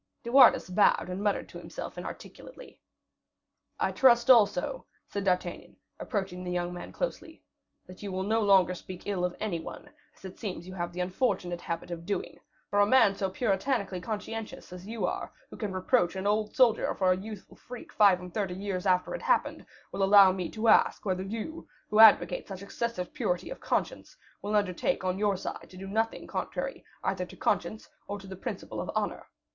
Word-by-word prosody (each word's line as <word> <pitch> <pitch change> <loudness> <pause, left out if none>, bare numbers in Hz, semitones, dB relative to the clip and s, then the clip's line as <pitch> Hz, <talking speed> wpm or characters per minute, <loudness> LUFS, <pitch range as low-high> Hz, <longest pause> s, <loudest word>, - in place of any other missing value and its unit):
De 235 - -5
Wardes 260 -2 +7
bowed, 200 -1 +3
and 180 +2 -4
muttered 205 -1 0
to - - -10
himself - - -7
inarticulately. - - -10 1.0
"I - - +1
trust 240 -2 +5
also," 200 -6 +3 0.2
said 200 - -4
D'Artagnan, 180 -2 -1 0.2
approaching 190 -5 -3
the 180 - -5
young 175 0 -2
man 175 - -8
closely, - - -5 0.4
"that 185 0 -13
you 200 -2 -5
will 185 0 -2
no 220 +3 +1
longer 195 -3 +4
speak 185 0 -9
ill 195 -3 -2
of 180 0 -1
any 195 -6 -2
one, - - -9 0.3
as - - -15
it 190 - -9
seems 180 -5 -5
you 185 - -8
have 175 -2 -4
the 180 +1 -4
unfortunate 180 -2 -1
habit 170 +1 -5
of 170 0 -7
doing; 200 -3 -3 0.3
for 205 - +2
a 205 - +6
man 225 -4 +5
so 195 -1 -2
puritanically 195 -1 -1
conscientious 215 -1 -6
as 180 +2 -10
you 220 -4 -2
are, - - -3 0.2
who - - -8
can 210 -3 -3
reproach 185 0 +1
an 190 +1 -4
old 210 +1 0
soldier 245 -4 +3
for 185 -1 +2
a - - +4
youthful 205 +1 -9
freak 245 0 -11
five 200 -3 +5
and 180 -1 -10
thirty 195 -4 -2
years 195 -1 -3
after 180 -1 +2
it - - -5
happened, - - +1 0.3
will 195 - -4
allow 195 -1 +7
me 185 -2 -3
to 220 +1 -2
ask - - +4
whether 185 -2 -1
you, 225 +11 -6 0.2
who 210 - +2
advocate 220 -1 +6
such 195 -1 -8
excessive 200 -2 -4
purity 180 0 -2
of - - -7
conscience, - - -3 0.2
will 210 +1 -2
undertake 190 -3 0
on 185 +1 -1
your 205 -2 +1
side - - -7
to 185 - -13
do 190 - -7
nothing 220 +3 -1
contrary - - -4 0.2
either 185 -1 -1
to 180 - -10
conscience 215 +6 -1 0.2
or 205 - -4
the 195 -1 -9
principle - - -5
of - - -6
honor. - - -2
195 Hz, 195 wpm, -29 LUFS, 180-215 Hz, 1.0 s, Wardes